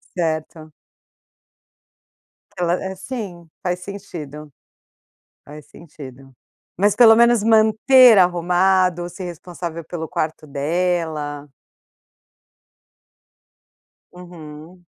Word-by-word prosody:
Certo. 155 -2 -4 1.8
Ela 175 -1 0
eh, 190 +1 -6
sim, 190 -5 -8
faz 180 0 -2
sentido, 165 -7 -9 0.9
faz 150 0 -13
sentido. 135 -5 -14 0.4
Mas 205 +2 +1
pelo 225 -1 +7
menos 235 -2 +4
manter 225 +2 +5
arrumado, 180 0 +1
ser 180 +2 -9
responsável 170 -1 -8
pelo 160 0 -7
quarto 155 0 -4
dela. 150 -1 -3 2.7
Uhum. 175 -1 -13
175 Hz, 75 wpm, -20 LUFS, 155-190 Hz, 2.7 s, pelo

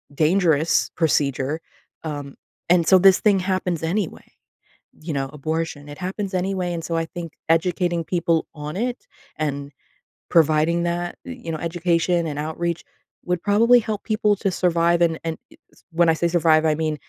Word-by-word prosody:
dangerous 155 -7 +2
procedure, 145 -1 0 0.4
um, 145 -3 -6 0.3
and 170 -1 +4
so 190 - +7
this 190 0 +6
thing 205 -2 +3
happens 185 -3 -1
anyway. 180 +2 -2 0.8
You 155 0 -5
know, 135 -1 -2
abortion, 155 0 -3
it 145 - -9
happens 190 +2 -4
anyway, 185 -1 -1
and 170 -1 -4
so 165 - -2
I 165 - 0
think 170 -2 -7 0.2
educating 175 0 +1
people 170 -1 0
on 150 -1 -6
it 245 +4 -3 0.3
and 140 -2 -3 0.6
providing 160 +1 +3
that, 175 0 -2
y 260 - -6
you - - -3
know, 160 - -3
education 170 +1 0
and 150 -1 -4
outreach 170 +2 -3 0.4
would 180 -1 -1
probably 230 +4 +5
help 215 -2 -4
people 215 -1 +2
to 200 - 0
survive, 170 -1 +2
and 165 -2 +2
and 165 -1 -2
e - - -18 0.2
s - - -24
when 170 +1 +3
I - - +5
say 170 - 0
survive, 160 -2 +3
I 155 - +3
mean 155 0 -1
170 Hz, 170 wpm, -22 LUFS, 155-180 Hz, 0.8 s, so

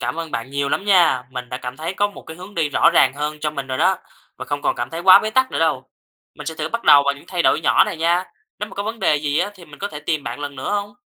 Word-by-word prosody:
cảm - - -2
ơn 165 -1 -5
bạn 115 +1 -4
nhiều 140 0 -1
lắm 195 - -1
nha, 170 -10 +4
mình 125 -1 -6
đã 125 - -4
cảm 125 -1 -7
thấy 165 +4 -4
có 205 +2 +1
một 205 - -12
cái 160 - -10
hướng 185 +3 -11
đi 160 -4 0
rõ 145 - +4
ràng - - +5
hơn 150 +1 -4
cho 150 0 -1
mình 140 -2 -5
rồi 130 -1 -3
đó 185 +4 +3 0.4
và - - -7
không 145 0 -4
còn - - +1
cảm 120 +1 -4
thấy 165 - -5
quá 185 +1 +8
bế 215 - -2
tắc 260 +3 +2
nữa - - -3
đâu. 145 -5 +1 0.5
Mình 150 - -10
sẽ 160 - -3
thử - - -3
bắt 230 0 -4
đầu 145 -1 +8
vào 140 0 +1
những 140 - -15
thay 175 -2 -1
đổi - - +3
nhỏ - - +4
này - - -5
nha. 170 +3 +1 0.3
Nếu - - -4
mà - - -12
có 200 - -3
vấn 225 +2 -5
đề 150 - +2
gì 145 0 -1
á 185 +4 0
thì 185 -3 -14
mình 150 -2 -15
có 200 - -3
thể 150 -6 -8
tìm 150 -1 -2
bạn 120 +4 -5
lần 145 -1 -6
nữa 130 - -4
hông? 205 0 -3
155 Hz, 325 wpm, -20 LUFS, 140-185 Hz, 0.5 s, quá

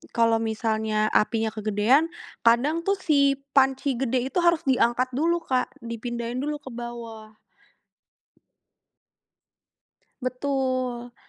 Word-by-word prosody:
kalau 230 -1 +4
misalnya 220 -1 -1
apinya 220 0 +2
kegedean, 215 +8 +2 0.4
kadang 285 +9 +3
tuh 395 - +3
si 280 -5 +3 0.2
panci 270 0 +3
gede 255 -1 +1
itu 360 - 0
harus 340 -1 +3
diangkat 250 0 +2
dulu, 335 +3 +1
Kak, 255 +1 -1
dipindahin 235 +1 -4
dulu 300 0 -2
ke 260 - -9
bawah. 230 -2 -8 2.9
Betul, 255 -2 -2
245 Hz, 100 wpm, -25 LUFS, 230-275 Hz, 2.9 s, kalau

